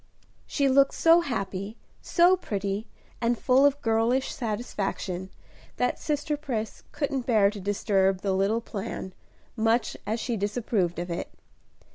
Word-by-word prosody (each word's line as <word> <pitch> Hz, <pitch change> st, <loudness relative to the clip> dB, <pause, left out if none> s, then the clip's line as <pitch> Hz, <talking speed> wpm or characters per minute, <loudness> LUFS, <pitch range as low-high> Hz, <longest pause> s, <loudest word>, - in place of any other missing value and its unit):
She 280 Hz, -2 st, +1 dB
looked 275 Hz, +1 st, +4 dB
so 330 Hz, +1 st, +6 dB
happy, 200 Hz, -, -4 dB, 0.2 s
so 355 Hz, +1 st, +4 dB
pretty, 205 Hz, -, -3 dB, 0.3 s
and 235 Hz, 0 st, +1 dB
full 265 Hz, +4 st, +5 dB
of 285 Hz, 0 st, -1 dB
girlish 230 Hz, +4 st, +1 dB
satisfaction, 205 Hz, -5 st, -3 dB, 0.5 s
that 250 Hz, -, 0 dB
sister 300 Hz, 0 st, -1 dB
Pris 245 Hz, -7 st, -4 dB
couldn't 280 Hz, -4 st, -2 dB
bear 210 Hz, -5 st, +4 dB
to 210 Hz, -, -8 dB
disturb 195 Hz, -1 st, +1 dB
the 195 Hz, -2 st, 0 dB
little 200 Hz, +4 st, +1 dB
plan, 195 Hz, -3 st, -6 dB, 0.4 s
much 225 Hz, 0 st, +1 dB
as 220 Hz, +2 st, -1 dB
she 235 Hz, 0 st, -2 dB
disapproved 205 Hz, -3 st, -1 dB
of 175 Hz, +1 st, -4 dB
it. 170 Hz, -, -4 dB
225 Hz, 135 wpm, -27 LUFS, 195-265 Hz, 0.5 s, so